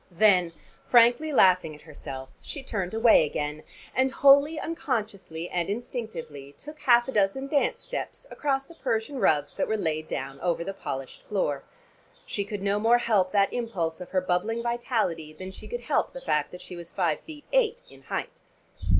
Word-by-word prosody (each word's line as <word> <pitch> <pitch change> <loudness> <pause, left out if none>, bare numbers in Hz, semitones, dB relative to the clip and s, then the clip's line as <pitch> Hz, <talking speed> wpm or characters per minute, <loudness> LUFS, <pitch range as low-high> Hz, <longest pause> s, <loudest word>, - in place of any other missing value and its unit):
Then 180 -2 +4 0.3
frankly 245 +6 +5
laughing 185 - +4
at 150 - -16
herself 135 -4 -8
she 285 - -6
turned 190 -7 -3
away 225 -4 +6
again, 150 0 -3 0.3
and 260 +1 +2
wholly 280 +4 +5
unconsciously 205 - -3
and 175 -1 -1
instinctively 200 - -5
took 300 - -11
half 240 -4 +5
a - - -2
dozen 210 +4 +1
dance 285 0 +1
steps - - -5
across 275 -2 -1
the 335 - -14
Persian 255 -2 -2
rugs 145 -7 +2
that - - -1
were 220 - 0
laid 155 -4 -1
down 135 0 -4
over 170 -1 0
the 195 - -4
polished 135 -7 -6
floor. 150 -9 0 0.6
She 200 - -2
could 205 -1 -5
no 200 +1 +1
more 230 +3 +5
help 205 -6 +2
that 200 -1 +3
impulse 185 -9 -2
of 180 - -7
her 185 - +1
bubbling 195 +6 0
vitality 220 -10 -1
than 185 +4 -8
she - - -11
could 485 0 -4
help - - 0
the - - -7
fact - - 0
that 180 - -9
she 180 - -8
was 170 -1 -8
five 170 -5 0
feet 300 -2 -11
eight - - +2
in - - -15
height. - - -5
205 Hz, 180 wpm, -27 LUFS, 170-250 Hz, 0.6 s, away